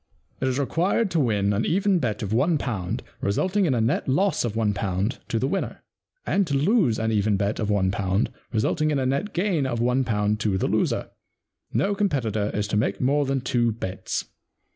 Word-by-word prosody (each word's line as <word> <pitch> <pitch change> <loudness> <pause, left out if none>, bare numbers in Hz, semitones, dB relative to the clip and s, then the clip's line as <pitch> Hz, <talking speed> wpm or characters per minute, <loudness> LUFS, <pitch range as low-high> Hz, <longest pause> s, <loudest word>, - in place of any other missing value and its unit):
* - - -39
It 130 - +1
is 130 0 0
required 180 - +1
to 165 - +1
win 105 -6 +2
an 105 +3 0
even 195 +1 +2
bet 110 -7 -2
of 105 +1 -2
one 150 +8 +3
pound, 100 -10 -3 0.2
resulting 185 - +1
in 135 - +2
a - - +1
net 115 +5 0
loss 185 +9 +2
of 115 -3 -2
one 110 -2 +1
pound 100 +3 -2
to 115 - -1
the 125 - 0
winner; 195 +7 -3 0.4
and 195 -3 +1
to 140 - 0
lose 155 - +3
an 110 0 0
even 105 -1 +2
bet 100 +1 -1
of 105 -2 -1
one 95 -2 +2
pound 95 +2 0 0.2
resulting 155 +8 +1
in 150 - +1
a 130 - 0
net 140 +11 -1
gain 175 -6 0
of 120 -3 -2
one 125 +3 +2
pound 105 -3 0
to 105 -3 0
the - - 0
loser. - - 0 0.6
No 200 - +1
competitor 125 - 0
is 105 0 -1
to - - +1
make 105 - 0
more 140 +2 +2
than 135 -1 0
two 120 -2 +1
bets.' 95 -4 -4
120 Hz, 210 wpm, -25 LUFS, 105-150 Hz, 0.6 s, one